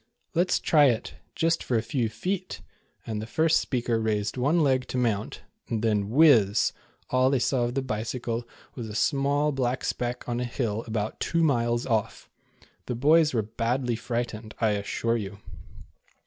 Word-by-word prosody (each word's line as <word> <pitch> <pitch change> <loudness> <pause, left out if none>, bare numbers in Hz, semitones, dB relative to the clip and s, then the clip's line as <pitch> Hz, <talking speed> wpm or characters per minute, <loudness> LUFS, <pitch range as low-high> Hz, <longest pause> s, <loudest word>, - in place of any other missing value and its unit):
" - - -47
Let 175 +2 +2
's - - +2
try 150 -3 +4
it, 120 -4 0 0.2
just 165 0 +1
for 120 - 0
a 110 - 0
few 120 -4 -1
feet," 185 - -4 0.4
and 110 -2 -3
the 110 - -6
first 160 +5 +3
speaker 120 -3 -1
raised 105 -2 -1
one 145 +6 +2
leg 130 -2 +1
to - - -4
mount, 110 -4 -1 0.3
when, 110 -3 0
whizz, 120 -7 +5 0.4
all 130 0 +4
they 135 - +2
saw 125 0 +1
of 120 +1 -4
the 135 - 0
Bicycle 115 +1 -3 0.3
was 115 -4 -6
a 105 - -7
small 140 +3 +1
black 130 -2 -1
speck 120 0 -3
on 120 0 -2
a - - -1
hill 115 -3 -2
about 110 -1 -3
two 170 0 +1
miles 120 -5 +1
off! 110 -4 -2 0.6
The 125 - -2
boys 150 +3 +4
were 110 - +2
badly 120 +3 -1
frightened, 115 -1 -4
I 110 - +3
assure 105 +3 -1
you. 100 -2 -6
120 Hz, 175 wpm, -26 LUFS, 110-135 Hz, 0.6 s, whizz